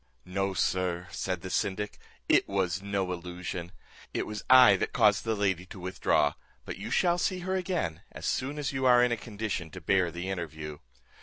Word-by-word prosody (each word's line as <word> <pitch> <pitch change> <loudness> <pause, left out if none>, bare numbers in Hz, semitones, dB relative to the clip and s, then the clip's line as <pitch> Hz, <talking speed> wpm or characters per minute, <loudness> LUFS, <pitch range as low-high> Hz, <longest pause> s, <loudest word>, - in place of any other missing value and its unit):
"No, 95 +1 -1
sir," 90 0 0
said 90 +1 -3
the 95 - -6
syndic, 105 +2 -1 0.3
"it - - +4
was 95 -1 0
no 100 -2 -1
illusion. 90 0 -6 0.4
It - - 0
was 105 0 -6
I 130 -5 +9
that - - -2
caused 105 0 +4
the 110 -1 +1
lady 95 -4 0
to 95 - -10
withdraw, 90 -5 +1 0.3
but - - -6
you - - -5
shall 175 -1 +2
see 185 0 0
her 185 +1 -1
again, 175 - -2
as - - -8
soon 140 +3 -1
as 145 -2 -2
you 135 0 -2
are 125 -1 +7
in 125 - +2
a - - +2
condition 105 -7 -4
to 90 - -9
bear 90 +2 +2
the 85 +2 -5
interview. 80 -5 -5
95 Hz, 190 wpm, -29 LUFS, 90-115 Hz, 0.4 s, I